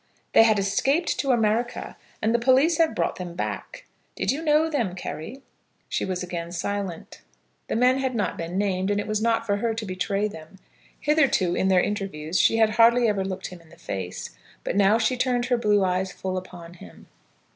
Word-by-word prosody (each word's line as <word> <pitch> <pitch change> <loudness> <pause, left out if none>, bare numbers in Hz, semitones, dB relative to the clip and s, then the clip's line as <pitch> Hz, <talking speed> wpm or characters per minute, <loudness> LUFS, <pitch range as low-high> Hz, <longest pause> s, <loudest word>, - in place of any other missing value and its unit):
"They - - +8
had 220 -2 +4
escaped 270 - +1
to 275 - -1
America, 235 0 0 0.3
and 220 +1 +2
the 235 - +3
police 270 +7 +3
have 325 -1 +3
brought - - -1
them 175 -2 -7
back. - - -5 0.3
Did - - 0
you 285 +4 -3
know 310 0 +3
them, 240 - -1
Carry?" 215 - -7 0.5
She - - -1
was 185 -1 -3
again 170 -1 -5
silent. 195 -1 -4 0.5
The - - -2
men 250 +3 +3
had 260 -2 -1
not 205 -4 -1
been 170 +2 -5
named, 190 -1 0
and 205 0 +1
it - - -3
was 215 0 -1
not 230 0 +1
for 200 -2 0
her 225 +1 -1
to 220 -1 -4
betray 195 +2 -1
them. 160 -1 -11 0.4
Hitherto, 275 - +2
in 190 - +1
their 185 -2 +4
interviews, 185 -5 -2
she 225 - +4
had 220 -1 +4
hardly 235 +1 +5
ever 205 -3 0
looked 190 0 -5
him 180 -2 -12
in 165 - -21
the 170 - -17
face, 95 -2 -6 0.3
but - - -3
now 200 +2 +4
she 230 +2 +1
turned 245 -1 0
her 245 0 +1
blue 210 -3 +3
eyes 185 +1 -1
full 185 -1 -4
upon 180 -2 -8
him. 90 - -14
205 Hz, 200 wpm, -25 LUFS, 185-240 Hz, 0.5 s, They